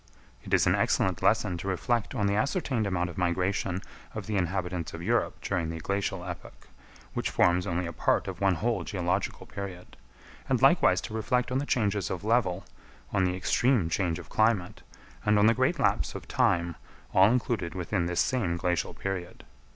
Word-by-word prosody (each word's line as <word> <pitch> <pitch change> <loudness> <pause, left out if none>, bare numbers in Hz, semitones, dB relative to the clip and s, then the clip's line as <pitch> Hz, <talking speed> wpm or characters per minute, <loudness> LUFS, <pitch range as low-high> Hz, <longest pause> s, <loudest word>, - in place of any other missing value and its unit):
It - - -10
is - - +4
an - - +4
excellent - - +1
lesson 90 -1 +2
to 95 - -6
reflect 105 +4 -1
on 100 - 0
the 100 - +2
ascertained 120 - 0
amount 90 -2 -1
of 85 - -7
migration 90 +1 0 0.3
of - - -4
the 105 - -3
inhabitants 90 -2 -2
of 85 - -7
Europe 115 +3 0
during 90 -5 -1
the 80 0 -5
glacial 95 +1 -2
epoch, 90 -1 -9 0.4
which - - -1
forms 90 +1 +2
only 85 +1 -1
a 85 - -5
part - - +1
of - - -6
one 95 -2 +3
whole 110 -1 -1
geological 90 +1 -2
period; 95 -3 -8 0.5
and - - +2
likewise - - +5
to - - -7
reflect 125 +3 0
on 130 - +1
the 145 - -3
changes 105 -4 0
of 95 +1 -4
level, 105 -5 +1 0.5
on 95 - +3
the 90 0 0
extreme 110 0 +2
change 85 -4 0
of - - -10
climate, 110 -5 +1 0.4
and 105 0 +3
on 105 - +5
the 115 - +6
great - - +1
lapse - - +1
of - - -7
time, 85 -1 +1 0.4
all 95 +2 +6
included 115 -8 -1
within 90 0 -1
this 90 0 +1
same 100 -10 0
glacial 90 -2 -1
period. 95 -3 -5
95 Hz, 185 wpm, -28 LUFS, 90-105 Hz, 0.5 s, the